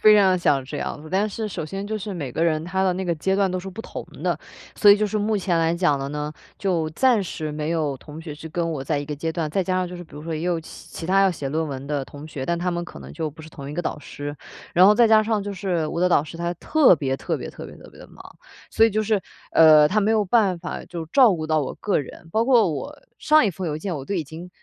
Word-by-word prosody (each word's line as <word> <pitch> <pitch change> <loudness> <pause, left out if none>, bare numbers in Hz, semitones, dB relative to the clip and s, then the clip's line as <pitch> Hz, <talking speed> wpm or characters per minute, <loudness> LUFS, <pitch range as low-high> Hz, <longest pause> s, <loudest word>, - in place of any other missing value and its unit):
非 215 0 +7
常 195 -2 +5
地 185 - +2
想 140 -6 +2
这 145 +3 -6
样。 155 +1 -5
但 200 +3 +1
是 215 +1 -4
首 160 -4 -5
先 195 +4 -5
就 215 0 -3
是 205 0 -5
每 145 -7 -4
个 160 - -2
人 155 -2 +1
他 190 +2 -1
的 185 - +3
那 190 +1 -3
个 175 - 0
阶 190 +5 0
段 195 -1 +2
都 185 - -2
是 190 +1 -7
不 200 +4 -8
同 - - -7 0.2
的， - - 0 0.4
所 205 - +7
以 200 - +8
就 215 0 +1
是 215 +1 -2
目 210 +1 +1
前 180 -3 0
来 165 +1 +2
讲 170 -6 +2
的 135 0 -4
呢， 150 +1 -4 0.2
就 175 -5 0
暂 240 +3 +3
时 155 -3 -5
没 150 +1 -3
有 150 -5 0
同 150 +4 -11
学 155 -3 -7
去 160 +2 -9
跟 165 +1 -2
我 135 -3 -4
在 145 +1 -1
一 145 - -4
个 150 - -4
阶 160 +3 -3
段， 160 -2 -2
再 190 +4 +1
加 185 0 -1
上 185 -1 0
就 180 - -8
是 175 - -8
比 155 - -24
如 150 - -8
说 165 0 -5
也 155 - -4
有 175 -2 0
其 - - -12
其 165 - -8
他 195 +1 +4
要 195 -1 +5
写 145 -5 -4
论 160 +2 -1
文 135 -1 -6
的 145 -2 -2
同 145 +2 -11
学， 135 -4 -6
但 170 - 0
他 180 +1 -1
们 175 0 -2
可 - - -11
能 - - -10
就 160 -2 -3
不 155 +2 -12
是 160 - -11
同 140 -3 -9
一 150 - -6
个 175 - -2
导 150 - -3
师。 145 0 -7 0.4
然 180 +2 +7
后 210 - +7
再 235 -1 +5
加 220 -1 +7
上 215 -2 0
就 205 0 -4
是 180 -4 -1
我 170 - -3
的 180 - +4
导 150 - +4
师 160 +2 -9
他 170 +1 -2
特 285 - +4
别 135 -2 -1
特 - - -2
别 - - -6
特 - - -9
别 - - -11
特 - - -14
别 - - -18
地 - - -12
忙， - - -14 0.5
所 225 - +5
以 - - 0
就 215 +2 0
是 215 -2 +1 0.3
呃， 155 -2 +7
他 215 +6 +2
没 210 +2 +2
有 215 -2 +2
办 195 -3 +3
法 - - -6
就 170 -2 -6
照 230 - +5
顾 155 -2 -4
到 155 -1 +2
我 140 - -4
个 205 - 0
人， 155 +3 -8
包 225 +4 +2
括 235 -8 +4
我 285 - -5 0.2
上 305 -3 +5
一 205 - +2
封 180 +1 -5
邮 150 - -2
件， 175 +3 -4
我 135 - -6
都 200 - -3
已 170 - 0
经 160 +5 -10
175 Hz, 330 characters per minute, -23 LUFS, 155-200 Hz, 0.5 s, 以